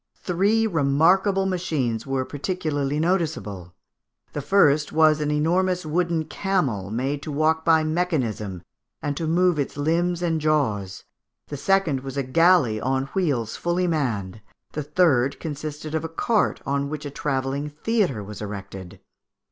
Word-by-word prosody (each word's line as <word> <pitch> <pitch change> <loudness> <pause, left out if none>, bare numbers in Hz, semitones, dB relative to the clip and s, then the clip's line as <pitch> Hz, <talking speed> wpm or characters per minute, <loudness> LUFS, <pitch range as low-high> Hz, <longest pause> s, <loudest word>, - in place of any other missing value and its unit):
Three 200 +5 +2
remarkable 185 +4 +3
machines 150 -11 -1
were 135 -1 -1
particularly 145 -2 -2
noticeable; 150 - -2 0.6
the 145 - -3
first 150 -3 +3
was 155 -1 +4
an 150 - 0
enormous 175 +4 +1
wooden 165 +1 0
camel 140 - -1
made 135 +6 -2
to 155 - -6
walk 155 +2 +1
by 160 -1 +4
mechanism, 130 - -2 0.4
and 145 -1 -1
to 160 +2 -3
move 175 0 +2
its 140 - -3
limbs 170 +4 0
and 165 -2 0
jaws; 110 -12 0 0.5
the 145 - -4
second 170 -2 +1
was 135 +1 -7
a 140 - +1
galley 135 -5 +3
on 135 +1 -1
wheels 135 - 0
fully 175 +1 0
manned; 115 - -2 0.3
the 150 - -3
third 145 -4 +2
consisted 155 0 -6
of 160 - -1
a 165 - -4
cart 215 +6 0
on 140 0 -1
which 150 0 -5
a 145 - -5
travelling 140 -1 -2
theatre 155 - -1
was 105 +1 -9
erected. 95 -3 -7
150 Hz, 145 wpm, -24 LUFS, 135-170 Hz, 0.6 s, was